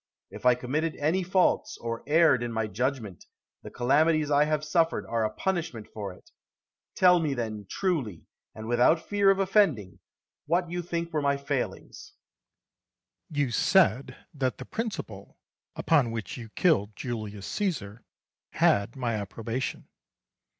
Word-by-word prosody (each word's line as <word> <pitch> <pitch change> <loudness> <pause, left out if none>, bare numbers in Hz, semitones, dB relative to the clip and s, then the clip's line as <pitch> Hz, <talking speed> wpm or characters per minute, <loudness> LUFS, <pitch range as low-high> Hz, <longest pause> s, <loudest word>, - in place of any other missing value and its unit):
If - - -2
I 125 - +6
committed 150 +6 -2
any 160 +6 0
faults, 185 0 +1
or 115 0 -4
erred 155 -5 +4
in 120 -1 -3
my 115 -1 -1
judgment, 110 - -3 0.4
the - - -9
calamities 150 +4 +2
I 145 +1 +4
have 150 0 -1
suffered 165 +1 +1
are 115 -1 -1
a 110 - +1
punishment 160 - -3
for 100 -3 -5
it. 90 - -18 0.6
Tell 180 -1 +5
me 150 -4 -1
then, 110 -4 -4
truly, 145 - -2 0.3
and 110 0 -8
without 125 +8 +3
fear 200 -1 +3
of 195 - +4
offending, 160 - +1 0.5
what 175 0 0
you 175 0 -2
think 170 -1 -4
were 155 - +1
my 140 0 +1
failings. 440 - -5 1.2
Atticus. 150 -3 -4
You 135 -4 0
said 135 - +3 0.2
that 130 -4 -1
the 130 - -8
principle 195 - -6 0.4
upon 145 -7 +2
which 115 +6 -5
you 120 -4 -9
killed 110 - +1
Julius 110 -5 -5
Caesar 125 - -3 0.5
had 100 +3 +2
my 125 -3 -2
approbation. 115 +4 -4
135 Hz, 145 wpm, -27 LUFS, 115-165 Hz, 1.2 s, I